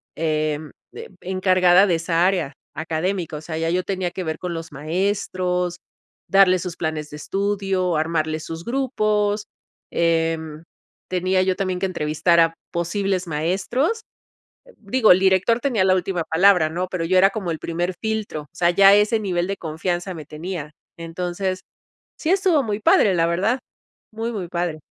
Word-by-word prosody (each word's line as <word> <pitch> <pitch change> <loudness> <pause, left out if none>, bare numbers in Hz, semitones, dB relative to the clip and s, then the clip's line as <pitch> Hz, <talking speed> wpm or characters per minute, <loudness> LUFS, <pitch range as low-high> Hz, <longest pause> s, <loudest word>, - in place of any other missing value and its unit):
em, 155 -1 -1 0.2
eh, - - -9
encargada 185 0 +4
de 175 -4 +2
esa 165 +1 +1
área 180 -7 0 0.2
académico, 160 +2 -2
o - - -8
sea, 160 0 -5
ya 165 0 0
yo 180 +1 0
tenía 185 -2 -2
que 185 - -5
ver 160 -1 -3
con 180 -1 -4
los 165 -1 -7
maestros, 180 +2 -1 0.5
darles 185 -2 +5
sus 180 -3 -5
planes 155 -2 -3
de 150 - -7
estudio, 195 0 -1
armarle 155 0 0
sus 165 +1 -7
grupos, 215 -5 0 0.5
em, 165 -2 0 0.4
tenía 185 +1 +1
yo 185 0 +1
también 185 -2 -2
que 195 - 0
entrevistar 170 -1 +1
a 165 0 +3 0.2
posibles 185 +2 -1
maestros. 190 - -1 0.8
Digo, 220 0 +4
el 185 - +4
director 190 +5 +3
tenía 235 -9 +1
la 185 0 +4
última 180 -2 -1
palabra 180 -1 +4
¿no?, 180 +3 -3
pero 180 -3 -2
yo 185 +3 +1
era 195 +1 +6
como 195 -4 -4
el 160 - -5
primer 175 +2 -2
filtro. 220 -8 -3
O 145 - -19
sea, 170 +1 +2
ya 195 +2 +7
ese 210 +2 +3
nivel 180 -3 -1
de 195 - -3
confianza 175 +3 -3
me 155 -3 -9
tenía, 155 -1 -6 0.2
entonces, 180 +3 -3 0.6
sí 320 - -2
estuvo 370 -6 +3
muy 210 -2 -3
padre, 200 -2 +4
la 165 -1 +2
verdad, 200 +10 0 0.5
muy, 225 +2 -3
muy 185 -5 -5
padre. 170 -3 -3
180 Hz, 165 wpm, -22 LUFS, 165-195 Hz, 0.8 s, ya